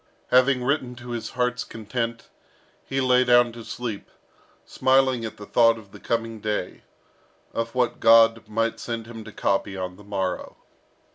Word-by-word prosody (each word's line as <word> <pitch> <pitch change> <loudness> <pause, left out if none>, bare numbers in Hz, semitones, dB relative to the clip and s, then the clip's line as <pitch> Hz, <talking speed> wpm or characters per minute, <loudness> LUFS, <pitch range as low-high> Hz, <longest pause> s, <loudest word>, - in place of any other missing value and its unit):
Having 130 0 +4
written 130 -2 -1
to 120 0 -9
his 120 -1 -4
heart's 125 -1 0
content, 115 +1 -4 0.6
he 135 - -1
lay 130 -1 +4
down 120 -1 +5
to 115 0 -10
sleep, 110 -1 -6 0.6
smiling 130 -2 +2
at 110 - -7
the 105 - -9
thought 115 0 +4
of 105 -3 -14
the - - -12
coming 115 -1 -2
day 105 -3 -3 0.7
of 115 +1 -3
what 125 -1 0
God 115 0 +5
might 115 +1 -1
send 115 -2 -4
him 115 -1 -9
to 110 - -10
copy 95 -1 -1
on 90 -1 -5
the 105 - -14
morrow. 95 -3 -3
115 Hz, 160 wpm, -24 LUFS, 110-125 Hz, 0.7 s, down